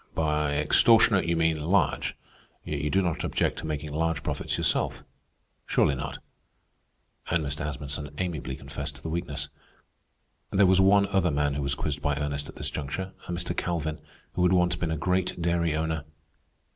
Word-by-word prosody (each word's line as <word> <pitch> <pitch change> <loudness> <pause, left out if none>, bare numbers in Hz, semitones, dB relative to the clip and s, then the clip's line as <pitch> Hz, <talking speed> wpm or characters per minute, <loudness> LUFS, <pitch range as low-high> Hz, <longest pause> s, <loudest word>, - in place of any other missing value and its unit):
"By 75 -2 +1
extortionate 100 +6 +5
you 85 - +2
mean 80 -2 +2
large; 80 -5 +1 0.5
yet 75 -2 -3
you 75 - 0
do 95 +3 +2
not 85 -3 -1
object - - 0
to - - -5
making 75 -1 -4
large 80 0 0
profits - - -2
yourself?... - - +1 0.6
Surely - - +3
not?" 65 - -4 1.1
And 85 -3 +1
Mr. 75 +2 -2
Asmunsen 75 0 -3
amiably 80 -8 -3
confessed 70 +1 -6
to 70 - -15
the 80 - -4
weakness. 85 -4 -3 1.0
There 100 +1 +4
was 95 0 +5
one 100 +1 +5
other 95 -3 +2
man 70 -1 +1
who 70 - -2
was 70 0 0
quizzed 75 0 -3
by 75 -2 +1
Ernest 75 0 -3
at - - -10
this - - -2
juncture, 85 +6 -4
a - - -4
Mr. 85 0 -2
Calvin, 80 -3 -2 0.3
who - - -1
had 90 +1 +4
once 90 -1 +3
been 85 -1 -2
a 80 - -1
great 90 +3 0
dairy 85 -2 +1
owner. 80 -1 -1
80 Hz, 175 wpm, -27 LUFS, 75-90 Hz, 1.1 s, extortionate